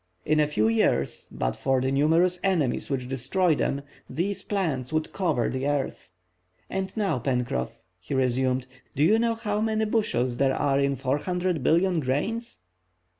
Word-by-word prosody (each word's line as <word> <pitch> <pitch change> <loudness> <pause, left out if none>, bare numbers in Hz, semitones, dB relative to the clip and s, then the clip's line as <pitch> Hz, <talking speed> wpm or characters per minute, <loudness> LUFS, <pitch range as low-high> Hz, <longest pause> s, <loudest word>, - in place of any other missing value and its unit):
In 155 0 +2
a 150 - +4
few 110 -7 +1
years, 110 - +1
but - - -2
for 135 -1 +1
the 130 +1 0
numerous 165 +6 +3
enemies 170 -10 0
which 130 -3 -2
destroy 135 +8 +1
them, 140 -1 -1 0.3
these 195 +5 -2
plants 155 - -2
would 155 0 -1
cover 160 - +1
the 130 +2 -2
earth. 145 -9 -2 0.6
And 190 0 -2
now, 195 - +1
Pencroff," 125 - -2 0.2
he 90 +10 -5
resumed, 130 0 +1 0.3
"do 145 - +2
you 215 +8 +5
know 230 0 +1
how 210 -2 -2
many 220 0 +1
bushels 130 - 0
there 135 -1 +2
are 140 -2 +1
in 140 0 +1
400,000,000,000 170 +4 +1
grains?" 205 - -2
145 Hz, 155 wpm, -26 LUFS, 130-185 Hz, 0.6 s, you